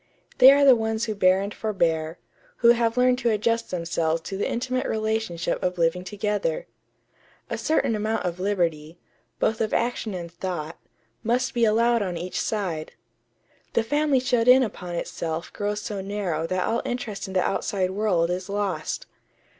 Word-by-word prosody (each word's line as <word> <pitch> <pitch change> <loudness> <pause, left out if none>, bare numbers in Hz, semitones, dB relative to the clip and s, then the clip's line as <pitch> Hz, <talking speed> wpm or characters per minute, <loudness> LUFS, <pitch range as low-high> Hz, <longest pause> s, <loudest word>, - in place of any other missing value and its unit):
They 260 +1 +10
are 280 0 +5
the 265 -2 +8
ones 220 0 -1
who 220 - -2
bear 190 -1 +3
and 200 +1 -4
forbear; 165 -6 -1 0.5
who - - +9
have 235 0 +3
learned 250 0 +4
to 240 -2 +1
adjust 230 +2 0
themselves 165 -2 -1
to 195 - -6
the 200 - -1
intimate 255 +2 -1
relationship 220 -6 -1
of 180 0 -1
living 170 +2 +1
together.... 210 - -2 0.9
A - - -1
certain 310 -7 +1
amount 215 0 -1
of 175 0 -3
liberty, 170 -5 -1 0.4
both 220 - 0
of 220 - 0
action 235 -4 -1
and 170 -2 -6
thought, 170 -2 -5 0.4
must 245 +2 0
be 235 -1 +3
allowed 230 +2 +3
on 180 -4 -2
each 180 +2 -3
side.... 180 -8 -3 0.8
The 230 - +2
family 290 +2 +2
shut 250 -2 +1
in 255 +1 +8
upon 180 -6 -5
itself 165 -1 -4
grows 205 0 -2
so 205 -2 -4
narrow 190 -5 -2
that 185 +1 -1
all 230 - 0
interest 215 -5 -4
in 190 - -7
the 185 - +3
outside 190 -1 -1
world 190 -4 +1
is 185 +2 -4
lost.... 205 - -2
205 Hz, 170 wpm, -25 LUFS, 180-230 Hz, 0.9 s, They